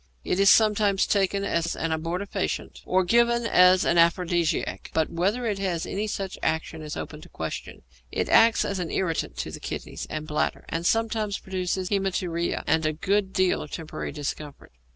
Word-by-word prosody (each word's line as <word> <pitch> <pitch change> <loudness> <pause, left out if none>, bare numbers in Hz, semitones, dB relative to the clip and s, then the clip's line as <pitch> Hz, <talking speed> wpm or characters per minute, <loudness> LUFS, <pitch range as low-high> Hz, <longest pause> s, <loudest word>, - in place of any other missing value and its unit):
It 180 - -1
is 200 0 +6
sometimes 210 -3 +4
taken 200 0 +1
as 170 -3 -1
an 165 - -2
abortifacient 180 +5 -3
or 185 +1 +3
given 235 +4 +3
as 180 -3 +5
an 170 - +3
aphrodisiac, 170 -1 +1
but 160 -1 +1
whether 200 +9 0
it 205 -3 -1
has 180 -4 -1
any 210 +2 -3
such 195 -2 -4
action 160 0 -2
is 150 -1 -6
open - - -7
to - - -14
question. - - -6 0.3
It - - -1
acts 225 0 +5
as 200 -1 -2
an 175 -2 -3
irritant 170 -4 -2
to - - -4
the - - -7
kidneys - - -6
and 155 0 -4
bladder, 150 0 -1
and 165 +1 -1
sometimes 220 -3 0
produces 185 0 -3
haæmaturia 185 -4 -1
and 160 0 +2
a 155 0 +1
good 190 +5 0
deal 185 -1 +2
of 150 - -8
temporary 160 +1 -5
discomfort. 145 0 -6
185 Hz, 175 wpm, -26 LUFS, 165-200 Hz, 0.3 s, is